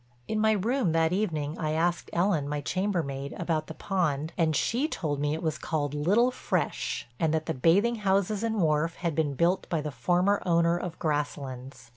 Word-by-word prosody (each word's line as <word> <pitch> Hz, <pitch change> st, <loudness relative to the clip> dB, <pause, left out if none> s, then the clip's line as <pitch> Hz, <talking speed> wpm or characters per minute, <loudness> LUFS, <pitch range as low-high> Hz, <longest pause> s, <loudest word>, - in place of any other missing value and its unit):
In 215 Hz, -, -1 dB
my 220 Hz, 0 st, +4 dB
room 215 Hz, -2 st, +1 dB
that 165 Hz, +1 st, +2 dB
evening 160 Hz, -7 st, -1 dB
I 155 Hz, -2 st, -1 dB
asked 170 Hz, +2 st, 0 dB
Ellen, 170 Hz, -5 st, +1 dB
my 150 Hz, 0 st, -1 dB
chambermaid, 140 Hz, -3 st, -2 dB
about 165 Hz, -3 st, -1 dB
the 160 Hz, -, -8 dB
pond 160 Hz, -5 st, -1 dB
and 160 Hz, -2 st, +1 dB
she 240 Hz, -, +1 dB
told 150 Hz, -, -3 dB
me 145 Hz, +1 st, 0 dB
it 160 Hz, -, -6 dB
was 160 Hz, -2 st, -1 dB
called 145 Hz, -3 st, -2 dB
Little 200 Hz, +12 st, +3 dB
Fresh 250 Hz, -, -2 dB
and 160 Hz, -2 st, +2 dB
that 155 Hz, 0 st, -1 dB
the 160 Hz, -, -1 dB
bathing 195 Hz, -, +3 dB
houses 200 Hz, 0 st, +1 dB
and 225 Hz, -1 st, -1 dB
wharf 160 Hz, 0 st, +1 dB
had 170 Hz, -2 st, -2 dB
been 145 Hz, -2 st, 0 dB
built 170 Hz, +5 st, +1 dB
by 165 Hz, -, 0 dB
the 150 Hz, 0 st, -4 dB
former 180 Hz, +7 st, +1 dB
owner 170 Hz, -1 st, +3 dB
of 175 Hz, -1 st, -4 dB
Grasslands. 140 Hz, -5 st, -3 dB
165 Hz, 190 wpm, -28 LUFS, 150-190 Hz, -, my